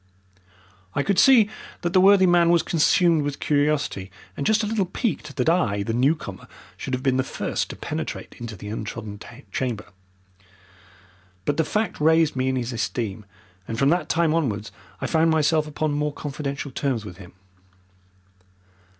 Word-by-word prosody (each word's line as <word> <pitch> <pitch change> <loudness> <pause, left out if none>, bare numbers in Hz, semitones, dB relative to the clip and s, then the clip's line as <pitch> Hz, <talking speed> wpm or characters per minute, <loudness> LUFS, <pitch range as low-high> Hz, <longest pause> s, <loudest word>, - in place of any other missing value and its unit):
I 140 - +1
could 200 +2 +1
see 245 -6 +7 0.3
that 175 +1 -2
the 185 - +6
worthy 195 0 +6
man 175 -1 +4
was 170 -1 +4
consumed 165 0 +3
with 145 -1 -3
curiosity 145 -9 0 0.3
and 140 - -2
just 220 0 +3
a - - +1
little 210 -3 0
piqued 225 +5 -3
that - - -1
I, 105 - +2
the 115 - -2
newcomer, 125 - 0 0.3
should 130 - -3
have 130 - -6
been 130 -1 +2
the 130 - +2
first - - -3
to - - -6
penetrate - - -5
into 115 -2 -6
the 105 +2 -8
untrodden 105 -1 -6 0.3
chamber. 120 -5 -2 1.6
But 145 - 0
the 160 - +3
fact 210 +1 -2
raised 160 -1 +4
me 130 0 0
in 130 - 0
his 125 -1 -2
esteem, 110 -3 -3 0.4
and 115 - -4
from 135 +3 +3
that 175 +3 +1
time 165 -1 +2
onwards 115 -10 -1 0.3
I - - -1
found 160 0 +2
myself 155 0 +2
upon 150 0 -2
more 150 +1 -1
confidential 140 -1 -5
terms 130 -5 -2
with 90 -4 -9
him. 90 -2 -13
145 Hz, 165 wpm, -24 LUFS, 120-165 Hz, 1.6 s, see